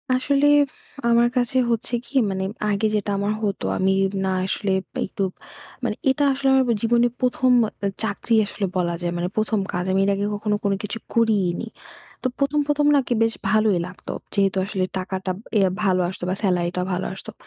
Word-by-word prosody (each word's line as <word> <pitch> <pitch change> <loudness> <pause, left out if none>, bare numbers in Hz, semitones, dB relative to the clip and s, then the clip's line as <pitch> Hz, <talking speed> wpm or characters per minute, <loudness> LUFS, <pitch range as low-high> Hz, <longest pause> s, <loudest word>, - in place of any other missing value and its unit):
আসলে 280 +2 +2 0.6
আমার 235 0 +4
কাছে 245 +1 +1
হচ্ছে 235 +2 -2
কী? - - -15 0.2
মানে, 190 0 -2 0.3
আগে 205 +2 +1
যেটা 205 -1 -1
আমার 200 +1 0
হত 205 -2 -2 0.2
আমি 190 +1 +2 0.3
না 190 - 0
আসলে 195 +1 -1 0.3
একটু 195 - -3 0.6
মানে - - -1
এটা 285 +2 +2
আসলে 270 +1 -2 0.2
আমার 240 -2 +1
জীবনে 235 +1 +3
১ম 255 0 +2 0.2
একটা 200 - -4 0.2
চাকরি 220 +2 0
আসলে 205 0 -3
বলা 170 -1 0
যায় 175 0 -1
মানে 175 +1 -1
১ম 215 0 +1
কাজ 180 - -1
আমি 190 +1 +2
এর - - +2
আগে 200 +1 -1
কখনো 210 0 -1
কোন 200 - +1
কিছু 210 +2 -4 0.2
করিই 220 -5 +3
নি। 230 - -5 0.6
তো - - +2
১ম, 280 +1 +1
১ম 295 0 +2
নাকি 265 -3 +1
বেশ 225 0 +1 0.2
ভালোই 215 -4 +3
লাগত 180 - -14 0.3
যেহেতু 195 -2 +2
আসলে 195 -2 -2
টাকাটা 185 0 -3 0.3
ইয়ে 195 -2 +4
ভালো 185 -2 +3
আসতো 185 - -8
বা 185 - 0
সেলারিটা 180 -2 +1
ভালো 180 +1 -2
আসতো। 195 +3 -9
205 Hz, 180 wpm, -23 LUFS, 190-235 Hz, 0.6 s, আমার